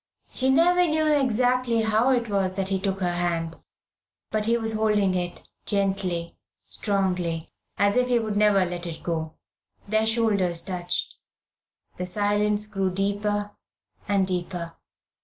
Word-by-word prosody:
She 260 0 +2
never 350 +5 +4
knew 310 0 +1
exactly 250 -4 +2
how 220 +3 +2
it 245 -3 +1
was 195 -3 0
that 190 -1 -1
he 195 -1 0
took 195 0 -2
her 175 -1 +1
hand, 170 -2 -1 0.7
but 215 0 0
he 235 +1 +3
was 225 -1 -1
holding 210 -3 +2
it 175 -1 -2 0.2
gently, 190 -4 0 0.3
strongly, 180 -5 -1 0.3
as 200 +1 +2
if 250 0 +3
he 245 -1 +3
would 220 -3 -2
never 205 -2 +4
let 175 0 -5
it 165 - -7
go. 160 -2 -3 0.5
Their 220 +1 +1
shoulders 205 -7 +2
touched. 180 -1 -2 0.8
The 180 - -4
silence 205 +2 +1
grew 195 -2 -1
deeper 205 +2 -1 0.6
and 200 -2 +2
deeper. 175 -2 -4
200 Hz, 140 wpm, -25 LUFS, 180-220 Hz, 0.8 s, never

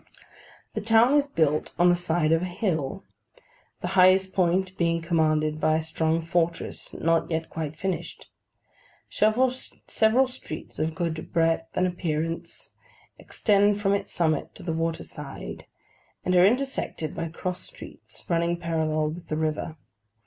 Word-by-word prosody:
The - - -2
town 225 +4 +5
is 290 -1 +4
built 155 - 0
on 175 +1 +5
the 175 - +5
side 170 -2 0
of 165 0 +3
a - - -1
hill, 180 - -2 0.8
the - - -2
highest 190 0 +5
point 185 +1 +1
being 170 -1 +1
commanded 155 -2 +1
by 155 - +3
a 160 - 0
strong 160 +1 0
fortress, 170 0 -1
not 165 0 +1
yet 160 -1 -2
quite 155 -2 -4
finished. 170 0 -4 0.8
Several 235 +5 +3
streets 250 -6 -1
of 160 0 -1
good 165 -3 -3
breadth 165 0 +1
and 180 - +3
appearance 165 -2 -3 0.5
extend 205 -1 +2
from 200 -1 +2
its 200 0 -2
summit 160 -3 0
to 195 - -11
the 170 -2 -2
water 165 0 -1
side, 145 -2 -8 0.6
and 185 - +1
are 180 +1 +7
intersected 250 - -1
by 165 - -3
cross 180 +2 -4
streets - - -9
running 170 0 +1
parallel 160 -2 0
with 170 +2 -9
the 155 - -2
river. 155 0 -2
170 Hz, 145 wpm, -26 LUFS, 160-190 Hz, 0.8 s, are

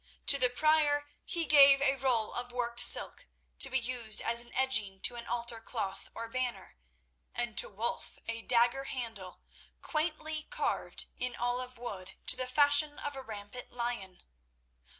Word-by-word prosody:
To 280 - +6
the 250 -1 +6
Prior 290 +1 +1
he 340 -2 -1
gave 280 -2 +8
a 275 -1 +2
roll 250 -5 0
of 245 0 -4
worked 240 -1 -2
silk 240 - +4 0.3
to 270 - +7
be 265 - +1
used 235 -3 0
as 235 0 +1
an 240 - -17
edging 230 -7 0
to 245 - +2
an 235 0 -8
altar 235 -1 -3
cloth 200 -5 -5
or 230 0 -6
banner, 250 - -4 0.6
and 240 -2 -3
to - - +2
Wulf 220 +4 -4
a 230 0 -4
dagger 245 +3 +2
handle, 225 -9 -5 0.4
quaintly 310 -1 -3
carved - - -2
in 250 -1 -3
olive 250 +1 -3
wood 195 -6 -7
to - - +4
the 255 0 -3
fashion 290 +2 +3
of 290 -1 -6
a 270 - -6
rampant 220 0 -9
lion. 235 -7 -5
245 Hz, 160 wpm, -31 LUFS, 230-275 Hz, 0.6 s, gave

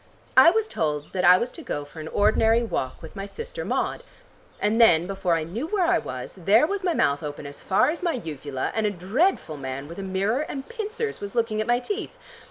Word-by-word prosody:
I - - +9
was 440 +4 +1
told 150 - -2
that 185 -1 -1
I 180 +1 +8
was 240 +6 -2
to 335 - -10
go 145 - -4
for 145 +3 -12
an 155 - -6
ordinary 220 +4 +3
walk 130 - -3
with 160 - -10
my 195 0 -5
sister 485 - -7
Maud. - - -1 0.6
And 215 +3 +2
then, 170 -7 +6
before 190 -2 0
I 160 - -1
knew 215 - -4
where 380 -1 +1
I 345 +1 +3
was, 130 -1 -6
there 215 - +5
was 395 +3 -2
my 355 -3 +1
mouth 145 +1 +2
open 145 -1 -6
as 140 0 -9
far 190 +9 +3
as 335 - -6
my 345 -2 0
uvula, 145 - -4
and 220 -1 +1
a - - +2
dreadful 200 - 0
man 135 +1 -5
with 170 +4 -9
a - - -3
mirror 195 +5 0
and 275 -2 -5
pincers 450 -1 -4
was 200 +1 -6
looking 225 -2 +1
at 215 - -3
my 240 0 +4
teeth. 405 - -5
205 Hz, 230 wpm, -25 LUFS, -, 0.6 s, I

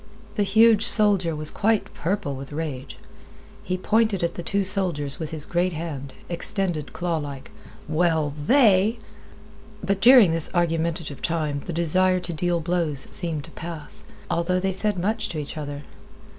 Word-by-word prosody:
The 210 - -1
huge 220 +2 +4
soldier 200 -8 +4
was 150 0 +1
quite 220 0 0
purple 175 -4 -3
with 135 +1 -9
rage. 145 -4 -6 0.6
He 185 +1 -3
pointed 215 -1 +1
at 170 - -1
the - - -6
two 200 +4 -1
soldiers 180 -8 0
with 160 -2 -4
his 155 -2 -3
great 175 +1 -1
hand, 145 -5 -6
extended 175 -4 0
clawlike. 145 -6 -4 0.4
"Well, 160 -2 0
they—" 220 - +4 0.9
But 195 0 -1
during 240 -7 +7
this 165 -1 -1
argumentative 165 -3 -1
time 155 -4 -2
the - - -3
desire 185 +3 +2
to 175 -1 -5
deal 175 +1 -1
blows 165 -4 0
seemed 165 -5 +1
to - - -12
pass, 160 -3 -6 0.2
although 180 +2 0
they 190 +1 -1
said 205 +1 +4
much 210 +6 -2
to 160 - -6
each 150 -1 -6
other. 145 -1 -6
170 Hz, 155 wpm, -23 LUFS, 155-195 Hz, 0.9 s, during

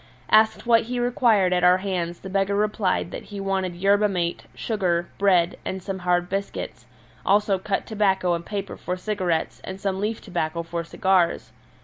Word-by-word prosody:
Asked 220 +1 +4
what 230 -1 +4
he 250 0 -1
required 235 -6 +3
at 180 0 +1
our 180 +1 +6
hands 180 -3 -3
the 190 - -7
beggar 195 +1 +1
replied 205 -4 0
that - - -7
he 205 - -8
wanted 190 -2 -1
yerba 200 +3 +3
mate, 175 -3 -2
sugar, 180 -6 -1
bread, 185 -3 +3
and 190 -1 -4
some 190 0 -4
hard 175 0 +1
biscuits, 195 +2 -5 0.4
also 200 -1 +2
cut 195 +1 -2
tobacco 195 -4 +1
and 170 0 -2
paper 200 +1 -5
for 180 - -4
cigarettes 180 -5 -2
and 190 0 -7
some 190 -1 -2
leaf 215 +2 -2
tobacco 170 -3 -3
for 170 0 -4
cigars. 185 -1 +1
190 Hz, 170 wpm, -24 LUFS, 180-205 Hz, 0.4 s, our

